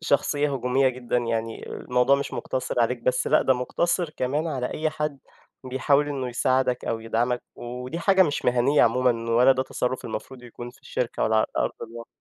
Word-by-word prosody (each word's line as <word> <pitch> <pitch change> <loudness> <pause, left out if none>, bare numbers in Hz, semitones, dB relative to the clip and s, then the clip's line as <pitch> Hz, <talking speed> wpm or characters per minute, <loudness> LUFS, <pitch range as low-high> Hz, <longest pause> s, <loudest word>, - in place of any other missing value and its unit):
شخصية 145 -2 +1
هجومية 130 +1 +2
جدًا، 125 -1 -2
يعني 115 -1 -3
الموضوع 125 +2 +2
مش 140 - -4
مقتصر 130 -1 -2
عليك 120 +1 +1
بس 125 +1 +1
لأ، - - +4
ده 130 - +3
مُقتصر 170 +6 -1
كمان 150 +3 -1
على 130 -5 -2
أي 155 0 -1
حد، 150 -2 -3 0.5
بيحاول 140 +3 +2
إنه 135 -3 -3
يساعدك 130 +1 +1
أو 115 - -2
يدعمك 120 +2 -1
ودي 125 +6 -6
حاجة 190 +2 +4
مش 145 -4 -1
مهنية 125 +4 +3
عمومًا، 115 -1 +2
ولا، 125 +3 +6
ده 130 0 0
تصرف 130 -1 -3
المفروض 125 +3 -6
يكون 120 0 -9
في 125 - -22
الشركة 120 -1 -3
ولا، 110 0 +2
على 110 - +3
أرض - - +1
الواقع. 115 +1 -8
125 Hz, 180 wpm, -25 LUFS, 120-140 Hz, 0.5 s, ولا